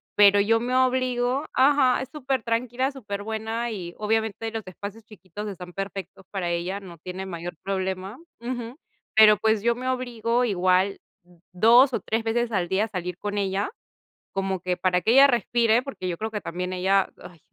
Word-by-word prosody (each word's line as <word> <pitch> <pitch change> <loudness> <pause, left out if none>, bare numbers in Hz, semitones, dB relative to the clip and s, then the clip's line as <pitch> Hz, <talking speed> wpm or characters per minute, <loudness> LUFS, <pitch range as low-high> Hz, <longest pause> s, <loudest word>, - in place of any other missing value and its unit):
Pero 205 -1 +7
yo 225 +3 +3
me 245 +2 -2
obligo 255 +1 +1
ajá, 265 -1 +4
es 260 - -6
supertranquila, 255 -2 -1
superbuena, 220 -1 -4
y 175 -5 -6
obviamente 220 +1 -1
los 225 -1 -5
espacios 200 +4 -8
chiquitos 205 -1 -9
están 180 -3 -8
perfectos 195 -1 -6
para 190 -3 -2
ella, 175 +3 -2
no 180 -4 -12
tiene 185 +3 -6
mayor 175 -1 -6
problema. 190 +2 -3 0.2
Ujú, 240 +1 -5 0.4
pero, 215 -1 +8
pues, 220 0 +1
yo 235 0 +2
me 255 +2 -3
obligo 245 -1 0
igual 185 -1 +2 0.5
2 235 +8 +6
o - - +1
3 225 +1 -1
veces 235 +1 0
al 180 -3 0
día 195 +3 +2
a - - -8
salir 180 -3 -4
con 205 +1 -4
ella, 195 0 0 0.6
como 195 -1 -1
que 180 -1 -1
para 180 0 +2
que 220 - +2
ella 275 +2 +8
respire, 235 -1 +2
porque 265 -9 -6
yo 170 - -3
creo 220 +3 -4
que 210 -1 -4
también 180 +1 -4
ella, 190 +1 +2 0.2
ay, 175 -2 -12
215 Hz, 175 wpm, -25 LUFS, 190-240 Hz, 0.6 s, pero